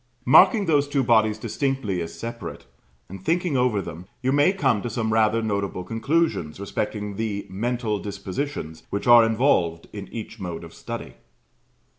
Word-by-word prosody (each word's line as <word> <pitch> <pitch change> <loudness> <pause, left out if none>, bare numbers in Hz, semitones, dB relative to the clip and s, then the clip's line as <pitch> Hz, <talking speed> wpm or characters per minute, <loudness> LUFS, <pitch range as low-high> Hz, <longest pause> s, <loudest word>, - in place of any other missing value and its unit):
Marking 195 - +6
those 145 -4 +2
two 140 -2 +1
bodies 110 -3 +3
distinctly 125 -7 -2
as 85 - -6
separate, 115 -7 -7 0.4
and 95 0 -10
thinking 175 - 0
over 125 -6 +2
them, 85 +2 -9 0.2
you 130 - +2
may 145 +5 +4
come 135 - +1
to 120 - -3
some 110 -1 -1
rather 110 +1 +3
notable 100 -3 -2
conclusions 115 - -1
respecting 105 0 -3
the 105 -2 -2
mental 115 +1 -1
dispositions 100 - -5
which 100 - -3
are 120 -1 +8
involved 110 - +1
in 100 -2 -7
each 115 0 -8
mode 90 -4 -5
of - - -11
study. - - -7
110 Hz, 155 wpm, -24 LUFS, 100-130 Hz, 0.4 s, are